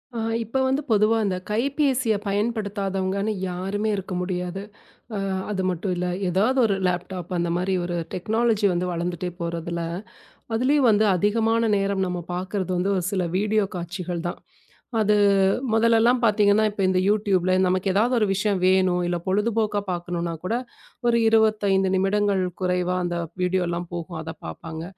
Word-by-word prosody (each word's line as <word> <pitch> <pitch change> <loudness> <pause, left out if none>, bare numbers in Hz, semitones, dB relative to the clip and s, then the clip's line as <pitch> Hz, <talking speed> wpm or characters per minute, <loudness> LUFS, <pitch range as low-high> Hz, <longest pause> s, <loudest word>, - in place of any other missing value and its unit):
அ - - -2 0.2
இப்ப 230 +3 -3
வந்து 265 +2 +1
பொதுவா 215 +1 +4
அந்தக் 185 -2 -2
கைப்பேசிய 255 0 +1
பயன்படுத்தாதவங்கன்னு 200 -2 -1 0.2
யாருமே 195 +4 -2
இருக்க 195 -1 -5
முடியாது. 180 +1 -3 0.5
அ - - -2 0.3
அது 190 - -1
மட்டும் 180 +1 -2
இல்ல 180 +1 -2 0.2
எதாவது 220 +9 +2
ஒரு 200 -3 +1
லேப்டாப் 180 0 -3
அந்த 170 0 0
மாரி 185 +2 -1
ஒரு 175 0 -3 0.2
டெக்னாலஜி 220 +3 +1
வந்து 175 +1 -1
வளர்ந்துட்டே 175 +1 -3
போறதுல. 170 0 -3 0.8
அதுலயும் 265 +2 +3
வந்து 215 0 +4
அதிகமான 225 +4 +2
நேரம் 195 -1 0
நம்ம 180 0 -3 0.2
பாக்குறது 185 +1 -3
வந்து 185 +3 0
ஒரு 180 - -1
சில 190 -2 0 0.2
வீடியோ 210 +1 +2
காட்சிகள் 175 0 -4
தான். - - -6 0.6
அது 210 -1 +3 0.6
முதல்லலாம் 230 +2 +4
பாத்தீங்கன்னா 210 -1 +4
இப்ப 205 -1 -5
இந்த 185 0 +2
YouTubeல 195 -3 +2
நமக்கு 185 +1 0
ஏதாவது 225 +6 +2
ஒரு 220 - +3
விஷயம் 195 0 0
வேணும் 185 -1 +3
இல்ல 175 0 0
பொழுதுபோக்கா 210 +1 +1
பாக்கணும்னா 175 -1 -3
கூட 215 +5 -1 0.5
ஒரு 235 0 +4
25 210 -4 +3
நிமிடங்கள் 195 0 +1 0.2
குறைவா 180 -1 0
அந்த 175 0 -2 0.3
வீடியோல்லாம் 175 -1 0
போகும் 170 -1 -5
அத 160 0 -6
பாப்பாங்க. 160 - -7
195 Hz, 145 wpm, -24 LUFS, 180-215 Hz, 0.8 s, பொதுவா